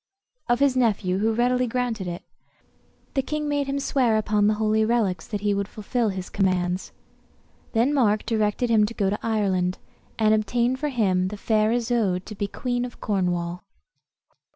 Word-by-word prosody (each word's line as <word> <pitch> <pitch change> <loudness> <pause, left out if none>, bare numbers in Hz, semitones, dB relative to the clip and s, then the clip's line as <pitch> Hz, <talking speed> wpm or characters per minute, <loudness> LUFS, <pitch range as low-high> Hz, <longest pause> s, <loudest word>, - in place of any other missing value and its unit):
] - - -39
of 240 - +3
his 280 -2 +3
nephew, 200 -7 +1
who 220 +2 +2
readily 250 +2 +1
granted 230 -5 -2
it. 175 0 -5 0.9
The 270 - +2
king 300 +2 -3
made 290 -1 0
him 275 0 -1
swear 250 -5 +2
upon 210 -1 +2
the 215 - +3
holy 220 0 +2
reliques 215 -7 0
that 205 -3 -4
he 205 -1 +1
would 200 0 -1
fulfil 220 +2 -1
his 190 -2 -5
commands. 185 -2 0 0.8
Then 240 +5 +2
Mark 215 -7 +2
directed 220 +1 0
him 210 -2 +4
to 230 - -8
go 195 -2 +1
to 210 - -2
Ireland, 190 -5 0 0.4
and 215 -1 +4
obtain 235 +4 +1
for 295 +3 -2
him 190 -8 +1
the 205 +2 -6
fair 215 +1 +2
Isoude 230 -6 0
to 215 - -8
be 205 0 -3
queen 245 +3 -2
of 245 -1 -7
Cornwall. 180 -3 -1
215 Hz, 175 wpm, -24 LUFS, 200-245 Hz, 0.9 s, him